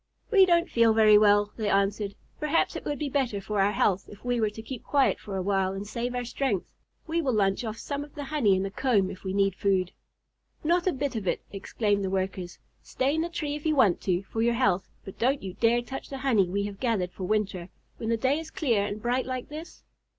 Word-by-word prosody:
"We 390 -4 +7
don't 340 0 +3
feel 230 -5 +4
very 215 -1 +7
well," 205 0 +4
they 215 -2 -1
answered. 200 +1 +1 0.2
"Perhaps 300 +2 +1
it - - -6
would 290 - -2
be 295 - -2
better 260 -7 0
for 205 0 -1
our 200 +1 +3
health 195 -2 +1
if 205 +3 -14
we 245 -1 0
were 215 - +2
to 210 +1 -9
keep 250 0 -7
quiet 280 -2 +2
for 195 -2 -6
a 185 - -2
while 195 -1 +1
and 195 +1 -5
save 240 +3 -3
our 245 0 -2
strength. 235 -5 -1 0.4
We 335 +1 0
will 265 -5 0
lunch 195 +1 +1
off 220 -1 -4
some 285 +3 -4
of 290 - -14
the 290 - -5
honey 270 -9 +2
in 190 - 0
the 195 - -3
comb 205 -5 +1
if 185 - -11
we 190 - -3
need 195 0 +2
food." 190 -1 0 0.7
"Not 345 +3 +2
a - - +4
bit 275 -2 -3
of 210 -4 -3
it!" - - 0
exclaimed 200 0 -1
the 190 - -1
Workers. 185 -2 -3 0.2
"Stay 270 +2 -1
in 320 - +1
the 340 - -2
tree 300 -4 -3
if 295 - -7
you 310 -1 +1
want 210 -10 +4
to 180 0 0
for 225 +3 -4
your 235 +1 +2
health, 200 -7 +1 0.2
but 195 - -10
don't 260 +3 +1
you 190 -2 -5
dare 235 +4 +2
touch 265 +3 -7
the 275 - -5
honey 235 -9 +2
we 200 +2 -1
have 200 -1 -6
gathered 215 -8 0
for 185 - -6
winter, 195 -3 -1 0.3
when 225 - -4
the 230 - +2
day 265 +6 +1
is 325 0 -8
clear 255 - +1
and 205 +1 -4
bright 250 +2 0
like 255 -1 -4
this." 310 +3 -9
220 Hz, 245 wpm, -27 LUFS, 195-270 Hz, 0.7 s, We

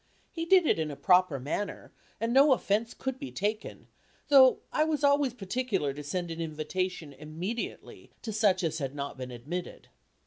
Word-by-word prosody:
He 330 -1 -4
did 370 -1 +5
it - - +2
in 155 -1 -1
a 145 - -6
proper 180 -4 +3
manner, 150 +10 -4 0.3
and 230 +2 -1
no 275 +1 +6
offence 225 -1 -1
could 265 -1 -4
be 130 - -7
taken, 205 - -3 0.4
though 265 -3 +7
I 305 - +3
was 310 -1 -1
always 285 -3 +3
particular 195 - -2
to 145 - -7
send 175 +4 -3
an 165 0 -5
invitation 160 0 -3
immediately 160 - -6
to 220 - -4
such 200 -3 +2
as 160 0 -1
had 135 -1 -4
not 140 0 -5
been 130 -1 -7
admitted. 145 +9 -7
185 Hz, 175 wpm, -29 LUFS, 150-250 Hz, 0.4 s, though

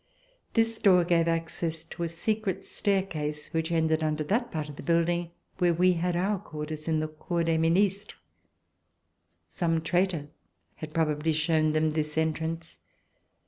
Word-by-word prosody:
This 225 -1 +2
door 185 -5 +5
gave 170 -1 +3
access 165 0 -2
to - - -10
a 170 - 0
secret 195 +2 -2
staircase 160 -7 -2
which 165 +1 -1
ended 160 -1 +2
under 155 -1 0
that 235 - 0
part 155 -2 -3
of 145 - -9
the - - -8
building 170 0 +1 0.3
where 175 -2 +3
we 180 +2 +4
had 175 +1 -1
our 195 +3 +1
quarters 155 -3 -6
in 160 -1 +2
the 155 - -1
Cour 165 +2 -2
des 165 -1 +1
Ministres. 195 +5 +2 1.3
Some 165 -3 0
traitor 170 -2 0 0.5
had 155 -1 -8
probably 155 0 +1
shown 155 0 +2
them 155 0 +2
this 150 0 -2
entrance. 160 +1 -2
165 Hz, 150 wpm, -28 LUFS, 155-180 Hz, 1.3 s, door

